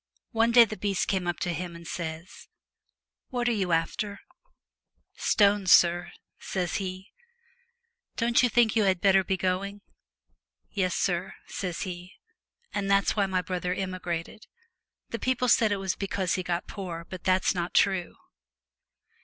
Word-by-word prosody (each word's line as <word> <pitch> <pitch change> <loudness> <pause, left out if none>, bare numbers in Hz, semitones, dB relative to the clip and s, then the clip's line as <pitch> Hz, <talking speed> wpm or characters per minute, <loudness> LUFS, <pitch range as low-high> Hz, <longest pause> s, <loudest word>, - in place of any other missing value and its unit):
One 230 -1 +2
day 235 0 +8
the 215 - -6
beast 200 -3 -1
comes 185 -3 -1
up 175 -2 -2
to 175 -2 -1
him, 175 0 -5
and 170 0 -11
says, 165 +1 -6 0.4
" - - -54
What 245 -1 -1
are - - +3
you 195 -6 -1
after? 185 +5 -1 0.3
" - - -63 0.2
" - - -47 0.2
Stones, 200 -3 +4
sur," 175 0 +5 0.3
says 180 -2 -2
he. 190 +1 -6 0.5
" 475 0 -49
Don't 235 0 +3
you 250 - +3
think 230 -2 +3
you 220 -2 +3
had 190 -2 +2
better 195 +1 +4
be 190 0 -1
going?" 190 +3 -2 0.5
" - - -45 0.3
Yes, 185 -3 0
sur," 180 0 -1
says 180 -3 -4
he. 180 0 -6 0.6
And 200 -1 -2
that's 195 0 +3
why 200 -2 +2
my 185 -1 0
brother 180 0 -2
emigrated. 185 +1 -4 0.6
The 230 - -4
people 255 +2 0
said 220 -3 +4
it - - +2
was 195 -1 -2
because 195 -2 -2
he 185 - 0
got 175 -1 -2
poor, 175 -4 -6
but 185 -2 -8
that's 185 0 +2
not 175 -1 -3
true.' 190 -3 +2
190 Hz, 170 wpm, -27 LUFS, 180-205 Hz, 0.6 s, day